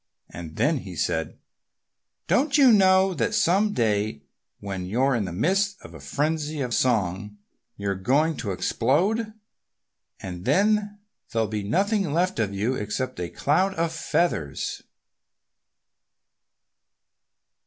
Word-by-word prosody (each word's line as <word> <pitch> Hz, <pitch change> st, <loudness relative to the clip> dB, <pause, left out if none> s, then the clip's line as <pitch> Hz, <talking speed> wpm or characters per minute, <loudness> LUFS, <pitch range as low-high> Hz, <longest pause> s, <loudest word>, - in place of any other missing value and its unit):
And 80 Hz, -3 st, -9 dB
then 150 Hz, -1 st, +1 dB
he 95 Hz, -6 st, -9 dB
said, 80 Hz, +1 st, -2 dB, 0.9 s
"Don't 280 Hz, +2 st, +2 dB
you 270 Hz, -4 st, +7 dB
know 190 Hz, -1 st, +5 dB
that 215 Hz, +4 st, -1 dB
some 210 Hz, 0 st, +3 dB
day 105 Hz, -, 0 dB, 0.4 s
when 95 Hz, -2 st, -5 dB
you're 130 Hz, +7 st, +1 dB
in 115 Hz, -5 st, 0 dB
the 90 Hz, -, -5 dB
midst 195 Hz, -, 0 dB
of -, -, -12 dB
a -, -, -10 dB
frenzy 155 Hz, 0 st, -2 dB
of 125 Hz, -3 st, -2 dB
song 105 Hz, -4 st, 0 dB, 0.4 s
you're 100 Hz, -1 st, -1 dB
going 140 Hz, -, +1 dB
to 105 Hz, -, -4 dB
explode? 185 Hz, -, 0 dB, 0.9 s
And 90 Hz, -2 st, -7 dB
then 205 Hz, -, +2 dB, 0.3 s
there'll 115 Hz, -1 st, 0 dB
be 105 Hz, 0 st, -3 dB
nothing 195 Hz, -, 0 dB
left 180 Hz, -2 st, 0 dB
of 105 Hz, -3 st, 0 dB
you 105 Hz, +6 st, -1 dB
except 130 Hz, +3 st, -3 dB
a 90 Hz, -1 st, -3 dB
cloud 190 Hz, +7 st, +1 dB
of 165 Hz, 0 st, 0 dB
feathers!" 160 Hz, -, -1 dB
135 Hz, 125 wpm, -25 LUFS, -, 0.9 s, you